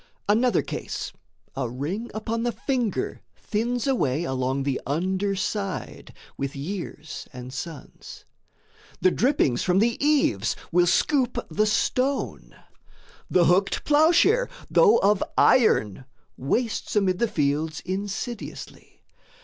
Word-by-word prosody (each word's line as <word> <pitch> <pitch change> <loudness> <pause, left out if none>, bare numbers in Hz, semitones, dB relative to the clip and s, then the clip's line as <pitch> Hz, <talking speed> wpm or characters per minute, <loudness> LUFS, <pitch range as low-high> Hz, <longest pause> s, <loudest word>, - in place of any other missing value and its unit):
Another 235 +4 +3
case: - - -5 0.4
A 120 - -2
ring 165 - -4
upon 225 +1 -2
the 240 0 0
finger 245 -3 -2
thins 235 +3 -2
away 165 - +1
Along 130 -1 -1
the 135 -1 -1
under 190 +7 0
side, 195 0 -4 0.3
with 140 0 -4
years 160 0 -6
and 125 -1 -9
suns; 160 +3 -9 0.8
The 185 - +4
drippings 225 - +2
from 180 0 +2
the 230 +6 +1
eaves 275 - +2 0.2
will 175 +1 +4
scoop 260 - +2
the 215 +7 +2
stone; 255 +5 -1 0.7
The 175 -2 +4
hooked 190 +3 +2
ploughshare, 340 +11 +4 0.2
though 445 -3 +6
of 200 0 +3
iron, 130 - +3 0.3
wastes 225 - -2
Amid 190 -3 +2
the 235 - +2
fields 155 -4 -1
insidiously. 205 +5 -6
195 Hz, 115 wpm, -25 LUFS, 150-240 Hz, 0.8 s, though